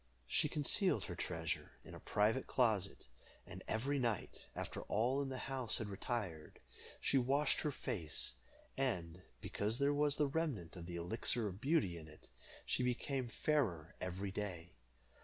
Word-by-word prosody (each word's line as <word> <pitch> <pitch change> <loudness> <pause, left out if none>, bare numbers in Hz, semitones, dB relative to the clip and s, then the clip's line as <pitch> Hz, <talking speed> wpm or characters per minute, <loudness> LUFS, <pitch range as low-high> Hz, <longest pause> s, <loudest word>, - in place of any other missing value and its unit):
She - - +3
concealed 180 +6 +2
her 90 - -4
treasure 80 -3 -2
in - - -10
her - - -7
private 110 +5 +2
closet, 110 -6 +2 0.4
and - - -8
every 135 +6 +1
night, 115 -6 -1
after - - -3
all 125 +6 +2
in 140 - -2
the 130 - -3
house 130 -2 -1
had 110 - -3
retired, 95 -6 -3 0.4
she 135 - +3
washed 140 +4 +3
her 150 - +1
face, 80 - -1 0.4
and, 90 -10 -1 0.2
because 105 +3 -1
there 140 +2 +3
was 145 0 +3
the 150 - +3
remnant 140 - -1
of 85 -2 -7
the 90 - -5
Elixir 105 +6 +1
of 95 +1 -6
Beauty 135 - +2
in 80 - -10
it, 75 0 -15 0.4
she - - +1
became 125 +1 0
fairer 115 - +1
every 95 +2 -2
day. 90 -4 -4
110 Hz, 160 wpm, -39 LUFS, 90-135 Hz, 0.4 s, She